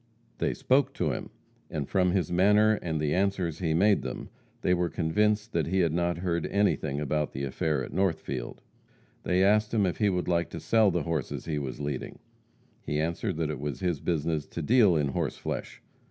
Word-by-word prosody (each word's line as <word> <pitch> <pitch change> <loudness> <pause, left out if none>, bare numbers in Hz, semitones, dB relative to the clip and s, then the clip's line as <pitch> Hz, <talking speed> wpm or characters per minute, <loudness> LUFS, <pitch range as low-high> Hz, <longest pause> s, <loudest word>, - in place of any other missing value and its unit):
They - - 0
spoke 135 +1 +2
to 80 -5 0
him, - - -5 0.4
and 75 -3 -3
from 90 -2 +2
his 90 -3 0
manner 105 +4 +4
and 80 -2 -2
the 75 -1 0
answers 95 -4 0
he 80 -4 0
made 100 +4 +4
them, - - -6 0.3
they 90 - +2
were 90 -1 +1
convinced 105 +7 0
that 80 -4 0
he 95 +2 +2
had 85 -3 +1
not 85 0 0
heard 85 -2 -1
anything 80 -8 +1
about 75 0 -1
the 65 - -4
affair 70 +1 -1
at - - -11
Northfield. 80 -9 -2 0.6
They 90 +1 +2
asked 105 +3 +3
him 105 -3 +3
if 90 - -1
he 105 -2 +2
would 90 -2 -1
like 85 -2 +1
to - - -6
sell 110 -2 +3
the 85 -4 0
horses 80 -4 -3
he 75 -3 -2
was 70 -2 -5
leading. 70 -3 -4 0.7
He 75 - -2
answered 85 +3 -2
that 80 -2 -1
it 75 - -5
was 75 +3 -4
his 90 -5 0
business 80 -2 -1
to 85 - -5
deal 105 - +5
in 75 -3 +1
horse - - -2
flesh. - - -5
85 Hz, 200 wpm, -28 LUFS, 75-95 Hz, 0.7 s, deal